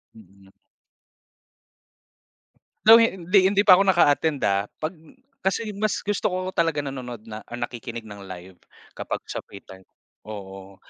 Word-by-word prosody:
Mm. 100 -2 -19 2.3
Though 225 +1 +10
hin 185 -6 0
hindi 200 0 +5
pa 185 -3 +7
ako 195 - +2
naka-attend, 155 -4 +3
ah. 100 +1 +1
'Pag 155 +2 -2 0.5
kasi 210 +2 -1
mas 210 +1 -2
gusto 205 -1 0
ko 185 -2 -2
talaga 165 -4 0
nanonood 125 -5 -7
na 110 -1 -8 0.2
nakikinig 120 -1 -6
ng 105 -2 -11
live 90 0 -11 0.4
kapag - - -5
sa - - -4
free 100 - -12
time, 95 0 -15 0.4
oo. 95 -2 -9
130 Hz, 130 wpm, -24 LUFS, -, 2.3 s, Though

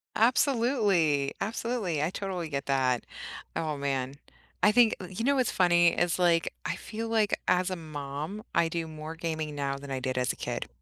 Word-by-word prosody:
Absolutely, 220 - +3
absolutely, 215 -6 -1
I 155 - +1
totally 185 -4 -3
get 140 -1 -3
that. 130 -3 +2 0.5
Oh, 155 -2 -1
man, 135 -1 -2 0.5
I 210 - +6
think 235 -1 +5
uh, 180 - -6
you 185 +5 -5
know 280 +1 +4
what's 255 -3 +2
funny? 175 -2 +5
It's 175 +1 +1
like, 170 -2 +3
I - - -1
feel 225 +1 -5
like 220 -2 +2
as 180 +1 +2
a - - -1
mom, 155 +4 -6
I 165 - +3
do 165 0 -3
more 155 0 -7
gaming 160 -2 -3
now 140 -1 -1
than 140 0 -10
I 135 -1 -2
did 130 0 -2
as 125 - +1
a - - -7
kid. - - -4
170 Hz, 190 wpm, -29 LUFS, 145-205 Hz, 0.5 s, I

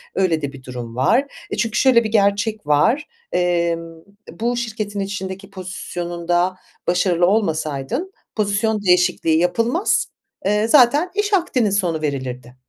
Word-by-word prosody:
Öyle 175 -5 +1
de 140 -1 -4
bir 135 -2 -12
durum 120 -2 -7
var. 225 - +3 0.3
Eee, - - -2
çünkü 220 0 0
şöyle 255 -3 +5
bir 220 - -2
gerçek 205 -2 +1
var, 225 - +3 0.2
emm, 170 -2 0
e, 200 +6 -17
bu 240 +2 0
şirketin 215 -3 -3
içindeki 195 0 -5
pozisyonunda 175 -1 -2 0.3
başarılı 175 -1 +2
olmasaydın 170 - -1 0.2
pozisyon 210 0 0
değişikliği 180 -3 +3
yapılmaz, 230 - +1 0.4
eee, 210 +2 +2
zaten 290 +7 +5
iş 415 0 0
akdinin 330 - +2
sonu 180 -6 0
verilirdi. 130 -4 -4
195 Hz, 130 wpm, -20 LUFS, 165-225 Hz, 0.4 s, şöyle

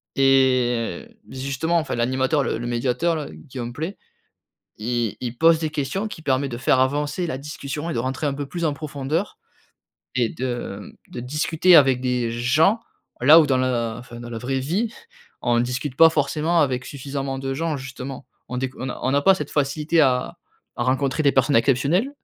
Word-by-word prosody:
et 130 -6 +2
heu, - - -24
justement, 140 +6 -1
enfin, 160 - -3
l'animateur 130 +5 +1
le - - -1
le 120 - -4
médiateur 125 +8 0
là, 155 -2 -3
Guillaume 125 -4 -7
Pley, 160 +9 -5 0.8
il 115 -1 -2
il 120 -1 -5
pose 165 0 +5
des 155 -1 -2
questions 155 +7 -2
qui 210 - -8
permet 135 -1 +1
de 120 -2 -6
faire 130 0 +3
avancer 145 +6 0
la 145 -6 -3
discussion 150 +2 -6
et - - -3
de - - -1
rentrer 130 +5 -2
un 140 - 0
peu 145 0 -4
plus 170 +5 -4
en 150 -3 +1
profondeur 150 +4 -3 0.8
et 120 -3 +2
de, 120 -5 -4
mmh, - - -11 0.2
de - - -5
discuter 155 +7 +3
avec 135 -4 +5
des 125 -2 0
gens, 155 - +3 0.4
là 145 +6 +8
où 155 - +3
dans 135 -2 +2
la 120 -3 0
enfin 120 -1 -11
dans 120 0 -8
la 115 - -4
vraie 130 +3 -2
vie, 195 - -1 0.5
on 120 -1 +2
ne 120 - +3
discute 130 +2 -3
pas 165 +1 +8
forcément 160 +2 +1
avec 130 -4 0
suffisamment 135 -1 -5
de 135 0 -3
gens, 160 +1 -1
justement. 135 0 -7 0.2
On 125 - -4
déc 130 0 -2
on 130 - -5
n'a 130 - -5
on 130 - +1
n'a 140 - +2
pas 195 +5 +6
cette 190 - -5
facilité 150 +3 +1
à 125 -3 +1 0.4
à 120 - -1
rencontrer 135 +3 0
des 140 - +5
personnes 135 +1 +3
exceptionnelles, 140 - +2
135 Hz, 195 wpm, -23 LUFS, 125-155 Hz, 0.8 s, là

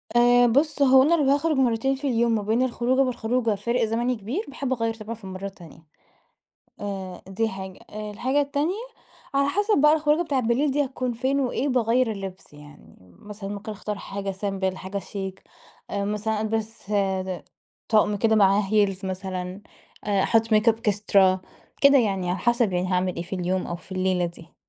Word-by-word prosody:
آآ 245 0 +6
بُصّ، 285 +4 +1
هو 265 -1 +7
أنا 325 +5 +4
لو 300 - +1
هاخرُج 290 +1 +2
مرتين 260 +1 +2
في 280 +1 -4
اليوم، 235 -2 +2
ما 215 - 0
بين 220 +4 +1
الخروجة 255 +1 +1
والخروجة 245 -3 0
فارق 235 +4 0
زمني 235 +3 0
كبير 240 - -4
باحب 270 -1 -3
أغيّر 230 -2 -1
طبعًا 225 +1 -7
في 220 - -22
المرة 190 +1 -7
التانية، 180 -5 -10 1.0
آآ 195 -3 -5
دي 220 +4 0
حاجة. 190 -2 -8
الحاجة 215 +6 -1
التانية 285 +5 0 0.6
على 280 0 +3
حسب 410 +5 +2
بقى 300 +1 +6
الخروجة 310 +1 +2
بتاعة 285 -6 0
بالليل 245 +5 +1
دي 290 +1 +1
هتكون 255 -2 -3
فين 265 +4 0
وإيه 265 +1 -1
باغيّر 245 -1 +2
اللبس، 195 -4 -7
يعني 150 0 -15 0.2
مثلًا 205 -1 -8
ممكن 205 +1 -6
أختار 210 0 -5
حاجة 200 0 -5
سيمبل، 190 -1 -2
حاجة 190 +2 -5
شيك 190 0 -6 0.5
مثلًا 210 +2 -1
ألبِس 220 -1 -3
آآ 190 -2 -1 0.4
طقم 210 -2 +3
كده 220 +1 +2
معاه 200 0 +4
heels 200 -2 +2
مثلًا، 185 0 -4 0.4
أحُط 220 +3 +2
ميك 215 +2 +4
أب 225 - +3
إكسترا 200 -3 +3 0.4
كده 280 -1 +7
يعني، 195 -6 0
على 180 - -1
حسب 235 -4 +2
يعني 180 +1 0
هاعمل 180 -1 0
إيه 170 - -3
في 175 - -15
اليوم 180 +1 -1
أو 175 - -4
في 180 +2 -14
الليلة 185 -1 +1
دي. 170 0 -12
215 Hz, 175 wpm, -25 LUFS, 195-255 Hz, 1.0 s, هو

